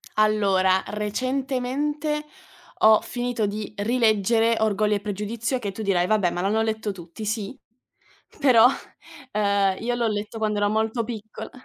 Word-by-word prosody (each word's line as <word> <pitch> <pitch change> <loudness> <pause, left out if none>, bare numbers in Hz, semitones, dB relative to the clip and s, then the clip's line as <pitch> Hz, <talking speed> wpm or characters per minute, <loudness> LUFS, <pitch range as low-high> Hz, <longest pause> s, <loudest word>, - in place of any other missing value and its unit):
Allora, 195 -3 +3
recentemente 265 +7 -2 0.6
ho 220 0 +7
finito 245 -3 -2
di 210 +1 -5
rileggere 225 0 +2
"Orgoglio 210 -1 +2
e - - -3
pregiudizio", 210 +5 -3
che 205 -5 -4
tu 220 - -6
dirai: 185 -4 +1
"Vabbè, 205 -3 +2
ma 175 - -4
l'hanno 210 +4 +1
letto 220 -1 -2
tutti". 175 +3 -10
Sì, 215 +2 -3 0.8
però, 245 -4 +6 0.7
uhm, 200 -2 +2
io 240 +1 -1
l'ho 235 -1 0
letto 210 +1 -4
quando 215 -1 -1
ero 205 0 +2
molto 220 +2 0
piccol 220 -2 -7
215 Hz, 140 wpm, -24 LUFS, 205-235 Hz, 0.8 s, ho